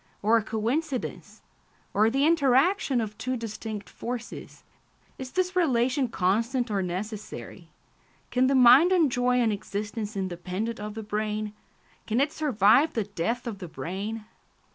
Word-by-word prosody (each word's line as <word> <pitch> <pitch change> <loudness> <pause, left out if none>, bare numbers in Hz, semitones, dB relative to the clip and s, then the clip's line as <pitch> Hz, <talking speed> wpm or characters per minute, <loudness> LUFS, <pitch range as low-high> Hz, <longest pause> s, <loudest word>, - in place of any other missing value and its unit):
or 220 +3 +4
a 225 - +3
coincidence? 245 +6 -3 0.5
or 215 +2 +4
the 270 +4 +2
interaction 285 -1 +3
of 215 -2 -3
two 255 0 -2
distinct 220 -2 -6
forces? 240 -1 -7 0.6
Is 260 -1 -6
this 370 0 0
relation 260 -5 +2
constant 230 +5 0
or 200 -2 0
necessary? 200 +4 -6 0.6
Can 255 +1 +3
the 275 - +2
mind 260 +7 +7
enjoy 250 -8 +3
an 230 -3 +2
existence 210 +1 -4
independent 190 +4 -3
of 210 0 -6
the 220 - -5
brain? 210 0 -3 0.5
Can 225 +2 +1
it 285 +2 +2
survive 270 0 +3
the 225 - 0
death 210 +5 -3
of 220 -5 -5
the 180 - -6
brain? 200 +7 -5
230 Hz, 140 wpm, -27 LUFS, 210-260 Hz, 0.6 s, mind